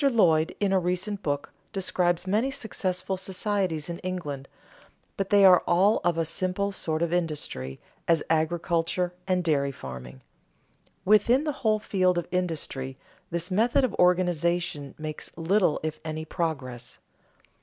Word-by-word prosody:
Lloyd, 180 - +3
in 200 -2 +1
a 190 - +4
recent 185 +3 -2
book, 145 -4 -2 0.2
describes 180 -2 0
many 215 +7 +1
successful 190 -8 -2
societies 190 -4 -1
in 170 -1 -5
England, 150 -7 -4 0.7
but 195 -1 -2
they 200 -1 +6
are 180 -2 +8
all 195 +5 +4
of 175 -1 +1
a 165 - +1
simple 185 +4 -1
sort 160 -4 -1
of 170 0 -1
industry, 150 - -2 0.3
as 165 -2 +3
agriculture 170 +2 0
and 185 -1 +1
dairy 140 -4 +1
farming. 65 - -9 0.8
Within 215 +7 +5
the 305 - 0
whole 215 -2 +3
field 185 -4 +1
of 175 - -2
industry, 155 -7 -2 0.3
this 170 +2 -3
method 235 +7 +3
of 250 -6 +1
organization 175 -4 +1
makes 155 -1 -6
little 175 0 +2
if 155 0 -3
any 155 0 -4
progress. 130 -8 -4
175 Hz, 140 wpm, -27 LUFS, 155-190 Hz, 0.8 s, are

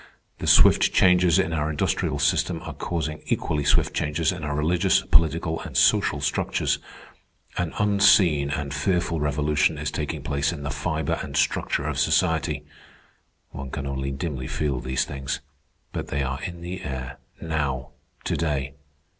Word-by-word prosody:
The - - -4
swift - - +6
changes 90 -1 +4
in 95 -3 +1
our 75 -1 0
industrial 75 - -1
system - - +1
are - - -6
causing 80 -2 -3
equally 75 -2 -1
swift 70 - +2
changes 80 +3 0
in 90 -3 -6
our 75 -1 -2
religious, 80 +4 +2
political, 80 0 +2
and - - -5
social - - +3
structures. - - 0 0.8
An 85 -3 -1
unseen 95 -8 +4
and 70 -1 -3
fearful 85 +2 0
revolution 75 +1 +1
is 75 +1 -3
taking 75 -1 -4
place 70 0 0
in 75 -4 -7
the 70 - -3
fibre 75 +1 -2
and - - -5
structure - - +1
of - - -2
society. 80 -2 +1 0.9
One 70 -1 -7
can 70 - -5
only 70 0 -3
dimly 70 -2 -4
feel 70 -3 -1
these 65 +1 -1
things. 70 -1 -4 0.5
But - - -4
they 70 0 -1
are 65 0 -3
in 85 -1 -6
the 90 +2 -6
air, 65 -1 -6 0.2
now, 70 -5 -2 0.3
to - - -1
day. 70 -4 -1
75 Hz, 155 wpm, -24 LUFS, 70-80 Hz, 0.9 s, swift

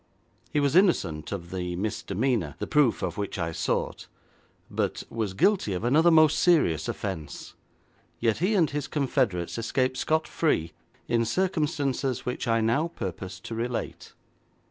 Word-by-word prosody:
He 150 - +1
was 145 +1 +1
innocent 95 - +2
of 85 -4 -5
the 90 -1 -3
misdemeanour, 100 - -1
the - - -3
proof 145 -6 +2
of 90 +1 -3
which 100 -1 -3
I 85 -2 -2
sought, - - -2 0.6
but - - -2
was 110 -5 -2
guilty 190 - +2
of 90 - -3
another 150 +8 +4
most 155 -2 +5
serious 85 - +3
offence, 80 -8 -5 0.7
yet 115 -2 +1
he 190 +6 +2
and 170 -5 +4
his 145 0 -3
confederates 125 - 0
escaped 130 +3 0
scot 160 0 +1
free 85 - 0 0.4
in 115 -1 +2
circumstances 145 - -1
which 125 0 -3
I 115 0 +2
now 120 +9 +2
purpose 95 - -6
to 115 - -7
relate. 115 +1 -4
115 Hz, 145 wpm, -27 LUFS, 95-150 Hz, 0.7 s, most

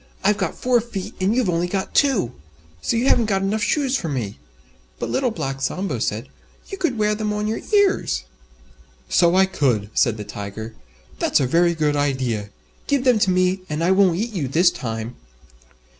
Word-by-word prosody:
I've 205 +1 +2
got - - -1
four 250 -2 +2
feet 215 -5 -6
and 195 +4 +2
you've 255 - +2
got 180 - 0
only 175 +1 -1 0.2
two." 260 - +2 0.6
"You 235 +3 +2
haven't 235 -4 +4
got 195 -2 0
enough 210 +3 0
shoes 275 +4 +1
for 170 -10 -2
me." 120 -8 -4 0.6
But - - -4
Little 260 -2 +1
Black 135 -11 -4
Sambo 185 +8 -2
said, - - -2 0.4
"You 390 - -6
could 335 -10 0
wear 210 0 +2
them 210 0 -2
on 210 0 -2
your 220 +1 -1
ears." 405 -2 +2 0.9
"So 170 0 +4
I 190 0 +6
could," 120 - 0
said 115 -2 +2
the 105 - -5
Tiger, 105 +2 -7 0.5
"that's - - +2
a 135 - +2
very 170 +6 +3
good 150 -2 +1
idea. 130 -7 -1 0.4
Give 280 -3 +1
them 250 -4 +4
to 195 - +2
me, 185 +1 +2
and 150 +2 -2
I 180 - +3
won't 190 -3 +4
eat 225 +3 -2
you 160 -9 -2
this 175 +7 +4
time." 115 -3 -5
185 Hz, 190 wpm, -22 LUFS, 135-220 Hz, 0.9 s, I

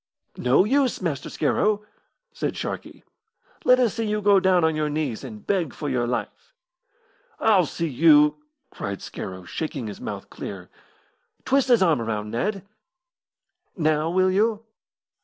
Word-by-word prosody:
"No 125 +8 +4
use, 265 +2 +1
Master 160 -7 -3
Scarrow," 210 0 0 0.5
said - - -3
Sharkey. - - -6 0.6
"Let 250 0 +5
us 240 -5 +2
see 230 - -2
you 210 0 0
go 200 -1 +5
down 185 -2 +3
on 160 -1 +2
your 155 -1 0
knees 145 -6 -3
and 110 -5 -9
beg 180 -7 -1
for 150 - -4
your 125 -2 0
life." 125 - -5 0.8
"I'll 195 -7 +4
see 165 - -3
you 150 +1 +5 0.2
" 275 -2 -52
cried 100 -1 -5
Scarrow, 95 -1 -7
shaking 140 - -4
his 105 -2 -7
mouth - - -6
clear. 95 -3 -8 0.7
"Twist 275 0 +2
his 240 -6 +5
arm 160 -9 +3
round, 105 -2 -3
Ned. 195 - -2 1.1
Now 155 -1 +1
will 185 +2 +2
you?" 215 +3 +1
165 Hz, 150 wpm, -24 LUFS, 130-210 Hz, 1.1 s, Let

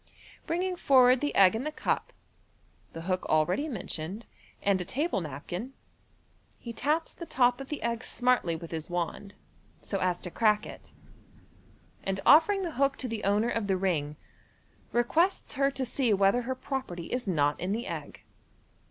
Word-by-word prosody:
Bringing 360 +2 -1
forward 255 -4 +5
the 290 - -1
egg 190 -2 +7
in 225 +3 -2
the 305 - -3
cup, - - -2 0.8
the 165 - -6
hook 185 +2 -1
already 175 - +2
mentioned, 195 - -5 0.4
and 195 -2 +2
a - - -1
table 265 - -1
napkin, 175 - -6 0.8
he 235 - -8
taps 305 +6 0
the 340 - -9
top 245 0 +2
of 270 - -8
the 300 - -4
egg 235 0 -1
smartly 245 -9 +1
with 165 0 -8
his 160 0 -4
wand, 175 +3 -4 0.4
so 195 - -3
as 180 -1 +1
to 180 - -8
crack 210 0 +2
it, - - -11 1.1
and 195 0 -2
offering 380 +6 +6
the 345 - -3
hook 275 0 +3
to 260 - -3
the 225 -3 -4
owner 210 +4 +2
of 225 -3 -1
the 190 -1 +1
ring, 155 -6 -1 0.8
requests 320 +11 +1
her 275 +1 +2
to 270 -1 -3
see 250 -1 0
whether 195 +5 +3
her 260 +2 -3
property 255 - -5
is 250 -3 -1
not 145 -5 +1
in 180 +2 -2
the 230 +4 -2
egg. - - -7
230 Hz, 170 wpm, -29 LUFS, 185-270 Hz, 1.1 s, egg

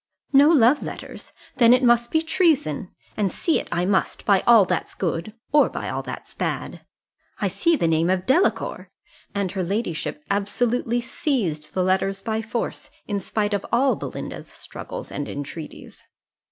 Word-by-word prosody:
"No 280 +2 +7
love 285 -2 +5
letters! - - -8 0.3
then 240 -1 +7
it 255 - 0
must 240 -1 +4
be 320 0 +1
treason; 320 - +1 0.3
and 200 -3 0
see 330 - +1
it - - -7
I 175 +1 0
must, 190 0 0
by 200 -2 +5
all 230 -4 +8
that's - - -2
good, 175 +3 -3 0.2
or 295 0 +5
by - - -5
all - - -2
that's - - -8
bad - - -4 0.6
I 205 - +1
see 200 - +2
the 170 - +1
name 165 +1 +2
of 185 0 0
Delacour!" 330 +9 +1 0.5
and 200 -3 -1
her 190 -2 -2
ladyship 175 -6 -3
absolutely 235 +4 0
seized 230 - -2
the 185 - +2
letters 190 +1 +1
by 220 +1 -1
force, 230 +1 -4 0.2
in 205 -1 -1
spite 205 +2 -1
of 200 - -1
all 260 +3 +3
Belinda's - - -7
struggles - - -9
and 145 - -4
entreaties. 145 +3 -8
210 Hz, 165 wpm, -23 LUFS, 185-245 Hz, 0.6 s, all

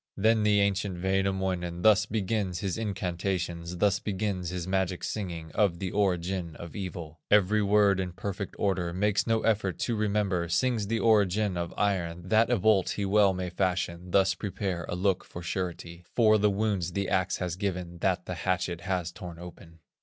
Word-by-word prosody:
Then 110 +2 +3
the 105 -1 +3
ancient 100 -2 -1
Wainamoinen 95 -2 -1
Thus 105 -1 +5
begins 100 -3 -1
his 95 -4 -1
incantations, 90 -4 -3
Thus 100 +1 +2
begins 100 -3 -2
his 90 -2 -4
magic 95 -1 -1
singing, 85 -6 -4
Of 100 -6 +2
the 95 0 -4
origin 90 -4 -1
of 85 -1 -9
evil; 85 -5 -6
Every 105 +1 +4
word 100 -1 +4
in 90 -2 -3
perfect 100 +1 -5
order, 90 -4 0
Makes 100 +3 +1
no 115 -1 +2
effort 100 -5 +1
to 120 - 0
remember, 100 -5 0
Sings 115 +2 +1
the 115 +2 0
origin 105 -3 +3
of 85 -1 -3
iron, 90 -4 -1
That 110 +3 +4
a 120 - +3
bolt 100 -1 +3
he 100 - -1
well 100 0 +4
may 90 -1 -4
fashion, 90 -1 -1
Thus 95 +1 +3
prepare 95 -2 -3
a - - -2
lock 95 0 +1
for 85 - -9
surety, 85 -1 -4
For 110 -2 +5
the 105 +1 +4
wounds 100 -4 -1
the 100 +1 -1
axe 95 -1 +1
has 90 -2 -3
given, 90 -3 -4
That 90 -1 0
the - - -4
hatchet 90 -1 -1
has 90 -2 -2
torn 85 -1 -9
open. 85 -1 -12
95 Hz, 175 wpm, -28 LUFS, 90-105 Hz, -, Thus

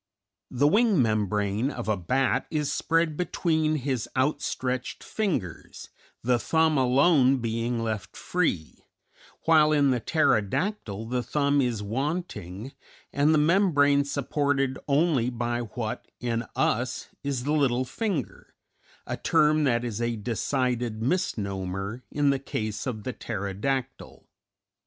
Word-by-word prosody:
The 135 +3 +2
wing 210 +1 +4
membrane 105 0 +1
of 120 -5 -6
a 110 - +2
bat 125 +9 0
is 150 -2 -1
spread 165 -1 +1
between 160 -2 0
his 130 -5 -2
out 135 +4 +1
stretched 125 0 -3
fingers, 155 - -3 0.3
the 125 0 +2
thumb 160 +7 +2
alone 135 +1 +4
being 115 0 -2
left 105 -4 -4
free, 155 - -2 0.6
while 155 -2 +5
in 145 -3 +4
the 125 - +1
pterodactyl 115 - 0
the 125 0 0
thumb 140 +2 +1
is 120 -5 -1
wanting 115 - -4 0.4
and 145 +2 +3
the 155 - +4
membrane 150 -4 +4
supported 140 -1 -1
only 140 -4 +2
by 120 -1 -2
what 115 -5 -5
in 115 -1 -2
us 125 +2 0
is 140 -3 -2
the 145 +3 0
little 130 -4 +2
finger, 175 - -4 0.5
a - - -4
term 150 0 +3
that 120 -3 +2
is 115 -1 -3
a 120 0 0
decided 120 +1 -1
misnomer 100 - -2
in 145 -1 +2
the 135 - 0
case 110 -4 -4
of 110 -5 -4
the 130 - -4
pterodactyl. 115 +6 -4
130 Hz, 130 wpm, -26 LUFS, 115-150 Hz, 0.6 s, while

